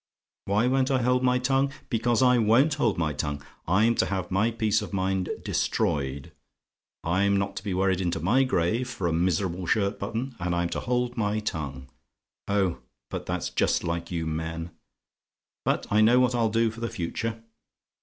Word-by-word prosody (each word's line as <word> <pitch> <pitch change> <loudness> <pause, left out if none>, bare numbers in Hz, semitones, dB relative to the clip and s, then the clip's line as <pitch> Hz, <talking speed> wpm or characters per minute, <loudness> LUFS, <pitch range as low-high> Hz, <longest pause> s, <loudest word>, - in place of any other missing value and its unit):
"WHY 105 +4 +2
WON'T 130 +1 +2
I 130 -3 +1
HOLD 125 +1 +2
MY 125 -1 +3
TONGUE? 135 +2 +1 0.2
"Because 120 +1 +2
I 125 -1 +5
WON'T 120 +8 +4
hold 120 -8 +1
my 80 -3 0
tongue. 70 +1 -3 0.2
I'm 105 +7 +4
to - - +2
have 95 -2 -3
my 100 +5 +2
peace 110 -2 +1
of 105 - -7
mind 95 -1 0
destroyed 70 -1 -1 0.7
I'm 100 +3 +1
to 100 - -7
be 100 -4 -2
worried 95 0 +1
into 85 -2 -1
my 115 - +3
grave 120 +1 0
for 100 -7 -4
a 85 - +1
miserable 90 +1 0
shirt 100 0 +1
button, 120 +3 -4
and 90 0 -1
I'm 85 0 0
to - - -3
hold 125 0 -1
my 105 -1 0
tongue! 70 -10 -4 0.6
Oh! 95 -8 +1 0.3
but - - -5
that's - - -2
just - - +1
like 85 0 -3
you 85 -2 -2
men! 80 +1 -4 0.9
"But - - +1
I 105 +1 +4
know 120 +3 +6
what 125 -1 +3
I'll 115 -2 +2
do 115 +1 +2
for 115 - -11
the 115 0 -2
future. 115 +3 -4
100 Hz, 180 wpm, -26 LUFS, 85-120 Hz, 0.9 s, know